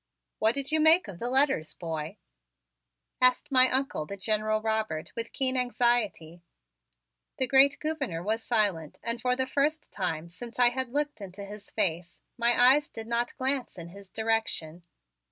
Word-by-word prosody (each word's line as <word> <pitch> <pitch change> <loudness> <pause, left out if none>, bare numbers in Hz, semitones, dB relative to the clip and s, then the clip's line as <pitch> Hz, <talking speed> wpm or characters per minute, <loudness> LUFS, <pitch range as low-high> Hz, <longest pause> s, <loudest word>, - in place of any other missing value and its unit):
"What 220 +2 +2
did 280 +1 -3
you 315 - +3
make 320 +1 +5
of 185 -4 -9
the 240 - -3
letters, 265 - +1
boy?" 160 -2 -5 1.0
asked 255 +3 +3
my 255 -1 +6
Uncle, 260 - -1
the 200 - -7
General 215 +2 0
Robert, 220 -7 -2
with 230 0 -5
keen 260 -1 0
anxiety. 240 -9 0 1.0
The 260 - +1
great 270 +2 +5
Gouverneur 275 - -3
was 220 +3 -1
silent 200 -10 0
and 230 0 -1
for 250 0 +1
the 260 0 -1
first 295 +4 -1
time 170 -3 -3
since 235 +6 -9
I 245 -1 +5
had 260 0 -3
looked 290 -3 -2
into 200 +1 -8
his 205 +1 -10
face 175 -4 -2 0.2
my 240 +1 +5
eyes 290 +1 -1
did 225 - -8
not 235 +1 -2
glance 265 -3 -1
in 170 -1 -8
his 195 +1 -14
direction. 220 -7 -2
230 Hz, 165 wpm, -28 LUFS, 190-260 Hz, 1.0 s, my